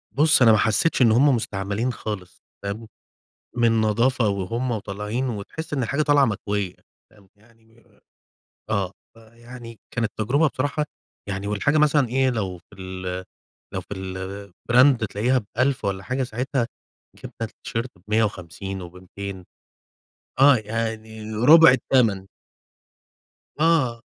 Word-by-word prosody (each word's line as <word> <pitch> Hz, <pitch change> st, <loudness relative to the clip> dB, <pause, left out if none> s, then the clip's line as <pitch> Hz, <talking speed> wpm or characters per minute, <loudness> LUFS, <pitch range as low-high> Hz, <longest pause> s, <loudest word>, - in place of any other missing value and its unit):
بُص 155 Hz, 0 st, +5 dB
أنا 115 Hz, -3 st, +7 dB
ما 110 Hz, -, +5 dB
حسّيتش 115 Hz, +8 st, +2 dB
إن 115 Hz, -, +6 dB
هُم 130 Hz, +4 st, +5 dB
مستعملين 105 Hz, +2 st, -2 dB
خالص 95 Hz, -6 st, -7 dB, 0.2 s
فاهم؟ 105 Hz, +3 st, -5 dB, 0.7 s
من 115 Hz, -2 st, +3 dB
نضافة 115 Hz, +2 st, +2 dB
وهُم 110 Hz, +6 st, -2 dB
وطالعين 105 Hz, +4 st, -3 dB
وتحس 125 Hz, +9 st, -6 dB
إن 135 Hz, -3 st, 0 dB
الحاجة 140 Hz, +6 st, 0 dB
طالعة 145 Hz, -2 st, +4 dB
مكوية 100 Hz, -4 st, -2 dB, 0.4 s
فاهم؟ 100 Hz, -3 st, -22 dB
يعني 115 Hz, +1 st, -26 dB, 0.9 s
آه، 100 Hz, -3 st, 0 dB, 0.2 s
فيعني 115 Hz, +1 st, -12 dB, 0.2 s
كانت 115 Hz, -3 st, -1 dB
تجربة 140 Hz, +9 st, +2 dB
بصراحة 145 Hz, +3 st, -1 dB, 0.4 s
يعني 100 Hz, +1 st, -4 dB
والحاجة 125 Hz, +9 st, +1 dB
مثلًا 145 Hz, -3 st, +3 dB
إيه 130 Hz, +2 st, +2 dB
لو 100 Hz, -7 st, -3 dB
في 85 Hz, -, -21 dB
ال 95 Hz, 0 st, -5 dB, 0.5 s
لو -, -, -1 dB
في -, -, -8 dB, 0.5 s
الbrand 120 Hz, +5 st, +3 dB
تلاقيها 115 Hz, +4 st, 0 dB
ب1000 130 Hz, +1 st, +1 dB
والّا 95 Hz, -1 st, -2 dB
حاجة، 130 Hz, +6 st, -2 dB
ساعتها 125 Hz, +1 st, -2 dB, 0.5 s
جبنا -, -, -10 dB
التيشرت 115 Hz, +2 st, -4 dB, 0.2 s
ب150 95 Hz, -3 st, -2 dB
وب200 90 Hz, +2 st, -8 dB, 0.9 s
آه 140 Hz, -1 st, +7 dB
يعني 110 Hz, 0 st, -4 dB
رُبع 155 Hz, +7 st, +8 dB
التَمَن. 115 Hz, -7 st, +2 dB, 1.3 s
آه، 145 Hz, -8 st, +2 dB
115 Hz, 120 wpm, -23 LUFS, 100-130 Hz, 1.3 s, رُبع